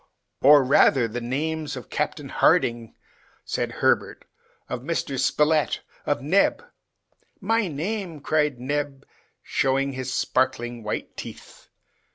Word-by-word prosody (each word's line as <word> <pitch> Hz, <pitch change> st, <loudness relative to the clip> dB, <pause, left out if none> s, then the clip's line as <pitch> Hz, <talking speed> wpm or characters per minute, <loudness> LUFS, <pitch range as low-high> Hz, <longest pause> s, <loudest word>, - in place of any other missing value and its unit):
"Or, 145 Hz, +1 st, +7 dB
rather, 130 Hz, -1 st, +4 dB
the 120 Hz, +2 st, -5 dB
names 150 Hz, +4 st, -2 dB
of 125 Hz, -4 st, -9 dB
Captain -, -, -2 dB
Harding," 115 Hz, -1 st, +2 dB, 0.5 s
said -, -, -2 dB
Herbert, -, -, 0 dB, 0.4 s
"of 125 Hz, -, -4 dB
Mr. 140 Hz, -2 st, -2 dB
Spilett, 150 Hz, +3 st, +2 dB, 0.3 s
of 120 Hz, -, 0 dB
Neb! 195 Hz, -, +2 dB, 0.4 s
" -, -, -42 dB
"My 225 Hz, -3 st, +2 dB
name!" 175 Hz, +2 st, -4 dB
cried 150 Hz, -2 st, 0 dB
Neb, 140 Hz, +1 st, -3 dB, 0.4 s
showing 135 Hz, +1 st, 0 dB
his 130 Hz, 0 st, -4 dB
sparkling 125 Hz, -2 st, 0 dB
white 105 Hz, -1 st, -5 dB
teeth. -, -, -10 dB
140 Hz, 120 wpm, -24 LUFS, 125-155 Hz, 0.5 s, Or